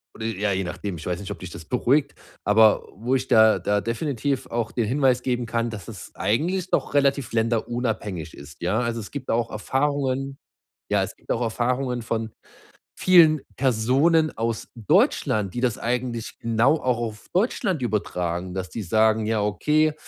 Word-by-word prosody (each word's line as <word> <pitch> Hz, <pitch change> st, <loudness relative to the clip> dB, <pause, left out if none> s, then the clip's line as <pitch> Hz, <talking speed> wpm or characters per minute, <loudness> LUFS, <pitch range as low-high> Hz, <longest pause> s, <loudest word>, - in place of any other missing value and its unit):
oder 110 Hz, -, -6 dB
ja, 105 Hz, -2 st, -1 dB
je 95 Hz, 0 st, 0 dB
nachdem, 90 Hz, +1 st, -5 dB
ich 80 Hz, -, -9 dB
weiß 90 Hz, -1 st, -2 dB
nicht, 100 Hz, -1 st, -7 dB
ob -, -, -6 dB
dich 90 Hz, -1 st, -8 dB
das 80 Hz, -, -9 dB
beruhigt, 135 Hz, -, +1 dB, 0.3 s
aber 110 Hz, +1 st, +4 dB
wo 115 Hz, +7 st, -2 dB
ich 130 Hz, 0 st, -1 dB
da 110 Hz, 0 st, +6 dB
da 105 Hz, 0 st, 0 dB
definitiv 135 Hz, +2 st, -2 dB
auch 115 Hz, -1 st, -2 dB
den 115 Hz, -, -1 dB
Hinweis 130 Hz, +1 st, +2 dB
geben 125 Hz, -2 st, -1 dB
kann, 115 Hz, +1 st, -1 dB
dass 105 Hz, -5 st, -8 dB
es -, -, -9 dB
eigentlich 175 Hz, -, 0 dB
doch -, -, 0 dB
relativ 140 Hz, -3 st, +1 dB
länderunabhängig 115 Hz, -6 st, -1 dB
ist, 70 Hz, 0 st, -13 dB
ja. 90 Hz, +6 st, +1 dB
Also 120 Hz, -1 st, -1 dB
es 105 Hz, -, -7 dB
gibt 145 Hz, -3 st, -6 dB
da -, -, +2 dB
auch 115 Hz, 0 st, 0 dB
Erfahrungen 135 Hz, +3 st, -1 dB, 0.5 s
ja, -, -, +3 dB
es -, -, -4 dB
gibt -, -, -16 dB
auch 120 Hz, -, 0 dB
Erfahrungen 125 Hz, +2 st, -1 dB
von 115 Hz, -1 st, -3 dB, 0.7 s
vielen 165 Hz, -5 st, +6 dB
Personen 135 Hz, +6 st, +2 dB
aus 115 Hz, 0 st, -2 dB
Deutschland, 105 Hz, -2 st, +2 dB
die 120 Hz, -, -3 dB
das 120 Hz, -3 st, +1 dB
eigentlich 120 Hz, -1 st, -3 dB
genau 115 Hz, +6 st, +2 dB
auch 125 Hz, -2 st, +1 dB
auf 110 Hz, -3 st, -5 dB
Deutschland 190 Hz, -, 0 dB
übertragen, 90 Hz, -5 st, -2 dB
dass 95 Hz, -1 st, -4 dB
die 115 Hz, -, -5 dB
sagen: 110 Hz, +3 st, +2 dB
„Ja, 110 Hz, -1 st, +1 dB
okay, 150 Hz, +9 st, +2 dB
115 Hz, 175 wpm, -24 LUFS, 105-130 Hz, 0.7 s, da